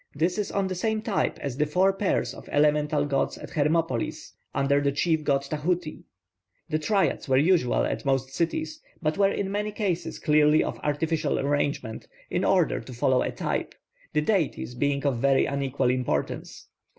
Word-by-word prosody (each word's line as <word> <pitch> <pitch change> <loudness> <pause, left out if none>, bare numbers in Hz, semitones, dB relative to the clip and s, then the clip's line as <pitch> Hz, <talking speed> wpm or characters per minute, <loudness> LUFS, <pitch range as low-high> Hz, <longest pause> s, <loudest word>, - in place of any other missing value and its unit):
This 170 +7 0
is 210 - -2
on 200 -1 0
the 190 - -2
same 215 +4 -1
type 210 -4 0
as 135 -3 -3
the 150 0 +1
four 185 +5 +3
pairs 195 0 0
of - - -12
elemental 150 0 +2
gods 140 -2 0
at - - -10
Hermopolis 150 -4 -1 0.2
under 140 +1 +2
the 140 0 +1
chief 160 +2 +1
god 140 -2 +1
Tahuti. 155 +3 -2 0.6
The 155 0 0
triads 195 -3 0
were 130 - +4
usual 160 -3 +3
at - - -3
most 135 -1 0
cities, 315 - -2 0.2
but 155 +5 0
were 195 -1 +5
in 195 -1 -2
many 210 +1 -1
cases 180 -6 -2
clearly 150 0 +4
of - - -4
artificial 155 +1 0
arrangement, 140 -5 -1 0.2
in - - 0
order - - +2
to 130 - -10
follow 125 +2 +2
a - - 0
type, - - -3 0.4
the 150 - +2
deities 165 - 0
being 140 +3 -1
of 135 -4 +1
very 135 +1 +3
unequal 140 -2 0
importance. 125 -1 -2
150 Hz, 175 wpm, -26 LUFS, 140-180 Hz, 0.6 s, were